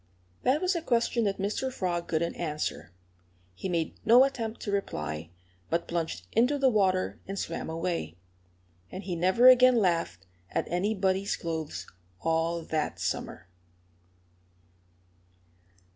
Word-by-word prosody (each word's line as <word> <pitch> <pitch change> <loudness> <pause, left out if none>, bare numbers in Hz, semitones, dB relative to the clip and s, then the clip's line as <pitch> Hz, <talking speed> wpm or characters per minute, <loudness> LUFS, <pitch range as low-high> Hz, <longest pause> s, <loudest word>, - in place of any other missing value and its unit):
That 275 +4 +2
was 365 0 +2
a 340 - -1
question 235 -4 +1
that 200 -1 0
Mr. 210 +7 -2
Frog 175 -6 -2
couldn't 165 +1 0
answer. 150 - -4 0.6
He 185 - -5
made 165 -3 -1
no 240 +4 +7
attempt 235 -5 -2
to 205 - -3
reply, 75 - -3 0.4
but 170 - -1
plunged 160 - -3
into 250 +6 +3
the 270 -2 +3
water 190 -4 +1
and 195 +1 -5
swam 165 -3 -4
away. 165 - -3 0.7
And 190 - -6
he 180 -2 -3
never 185 +9 +4
again 255 0 +8
laughed 170 - 0 0.2
at - - -1
anybody's 195 +1 0
clothes 160 -2 -4 0.3
all 165 +1 0
that 155 -1 -2
summer. 90 - -3
185 Hz, 130 wpm, -28 LUFS, 165-225 Hz, 0.7 s, again